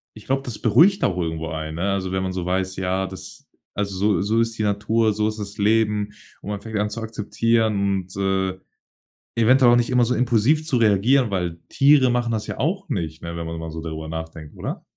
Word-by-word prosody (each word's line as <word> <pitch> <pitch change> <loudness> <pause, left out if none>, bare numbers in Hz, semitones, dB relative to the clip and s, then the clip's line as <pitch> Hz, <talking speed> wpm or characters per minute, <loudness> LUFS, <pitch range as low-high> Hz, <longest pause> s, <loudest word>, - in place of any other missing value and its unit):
ich 105 - -13
glaube, 135 +1 0
das 120 -5 -5
beruhigt 165 - +4
auch 90 - +1
irgendwo 80 -2 -2
einen, 80 0 -5
ne? 95 +4 -1
Also, 95 -1 -2
wenn 95 0 -1
man 95 -1 -3
so 90 -1 -3
weiß, 95 +1 -1
ja, 95 +1 -1
das 95 -1 -10 0.3
also, 100 -1 -2
so 100 -1 +1
so 110 +4 +1
ist 115 0 0
die 110 - -1
Natur, 105 +2 +1
so 105 +1 0
ist 110 0 -4
das 100 -1 -7
Leben. 105 -1 +1 0.3
Und - - -8
man 100 -1 -4
fängt 110 0 -5
an, 105 +1 0
zu 115 - -4
akzeptieren 110 0 0 0.3
und, 95 - -13
äh, 95 -1 0 0.8
eventuell 120 +2 +5
auch - - +6
nicht 120 -1 +2
immer 125 -1 +4
so 125 - 0
impulsiv 125 +6 +2
zu 135 -6 +1
reagieren, 115 +4 +3
weil 90 -3 -2
Tiere 140 -2 +5
machen 120 -1 0
das 110 -2 -2
ja - - -5
auch 190 +5 -1
nicht, 80 - -3
ne, 85 0 -6
wenn 85 - -4
man 80 0 -5
mal 80 - -6
so 80 - -6
darüber 80 -1 -6
nachdenkt, 80 -1 -7
oder? - - -5
105 Hz, 225 wpm, -22 LUFS, 95-115 Hz, 0.8 s, auch